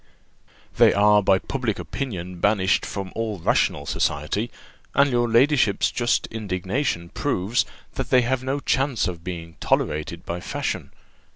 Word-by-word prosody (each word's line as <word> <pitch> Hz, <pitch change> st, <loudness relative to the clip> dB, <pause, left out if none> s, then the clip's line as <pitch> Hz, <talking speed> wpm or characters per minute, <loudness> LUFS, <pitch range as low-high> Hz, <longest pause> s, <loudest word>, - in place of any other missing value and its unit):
"They -, -, +6 dB
are 105 Hz, +1 st, +5 dB
by 95 Hz, -1 st, +4 dB
public 120 Hz, 0 st, -2 dB
opinion 90 Hz, -9 st, -5 dB
banished 100 Hz, -1 st, +2 dB
from 95 Hz, -2 st, -5 dB
all 110 Hz, -3 st, -2 dB
rational 90 Hz, -, +1 dB
society; 75 Hz, +13 st, -1 dB, 0.5 s
and 140 Hz, 0 st, +4 dB
your 120 Hz, -1 st, +2 dB
ladyship's 120 Hz, -3 st, +3 dB
just 120 Hz, -1 st, +1 dB
indignation 95 Hz, -2 st, -2 dB
proves, 100 Hz, +9 st, 0 dB, 0.3 s
that 130 Hz, -2 st, -4 dB
they 130 Hz, -1 st, +5 dB
have 130 Hz, +1 st, -1 dB
no 135 Hz, +2 st, -1 dB
chance 135 Hz, -7 st, +1 dB
of 85 Hz, -2 st, -6 dB
being 85 Hz, -2 st, -7 dB
tolerated 75 Hz, +3 st, -1 dB
by 85 Hz, +1 st, -3 dB
fashion. -, -, -3 dB
105 Hz, 135 wpm, -24 LUFS, 90-125 Hz, 0.5 s, They